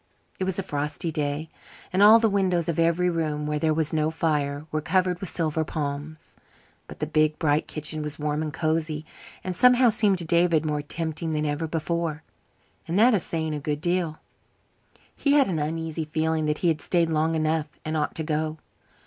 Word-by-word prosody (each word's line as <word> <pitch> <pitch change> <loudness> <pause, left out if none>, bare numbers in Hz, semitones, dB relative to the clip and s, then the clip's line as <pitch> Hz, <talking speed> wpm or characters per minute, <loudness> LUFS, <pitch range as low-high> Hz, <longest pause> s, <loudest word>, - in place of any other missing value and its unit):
It 190 - 0
was 190 -1 -1
a 195 - -1
frosty 150 0 -3
day, 150 +1 -3 0.4
and 190 - +2
all 215 +2 +9
the 225 0 +3
windows 185 -5 +1
of 170 -1 -1
every 170 +2 +2
room 155 -3 -1
where 150 0 -1
there 155 +1 +2
was 155 0 -1
no 155 0 +1
fire 150 -3 -1
were 155 - -1
covered 180 +2 +1
with 190 - -2
silver 160 -1 -1
palms. 150 0 -5 0.5
But - - -10
the 155 - -2
big, 155 0 +1
bright 150 -1 +1
kitchen 155 0 -4
was 150 0 -5
warm 150 0 -1
and 155 -1 -3
cosy, 155 -1 -1 0.4
and 185 -1 -3
somehow 250 +3 +6
seemed 210 -3 +3
to 170 - -3
David 170 -1 +3
more 150 -1 -1
tempting 160 +1 -3
than 155 0 0
ever 150 +2 -1
before, 160 -1 -2 0.6
and 170 - -1
that 235 +4 +6
is 200 - +2
saying 160 -1 -2
a 150 - -3
good 150 0 -2
deal. 175 -1 -1 1.0
He 280 - +1
had 285 -2 +5
an 170 -5 -1
uneasy 160 +1 -3
feeling 155 0 0
that 150 0 0
he - - +5
had 160 -2 0
stayed 170 -2 +1
long 160 +1 +1
enough 155 -1 0 0.2
and 155 +1 -2
ought 150 -1 -1
to 160 - -2
go. 155 0 -2
160 Hz, 200 wpm, -25 LUFS, 150-170 Hz, 1.0 s, all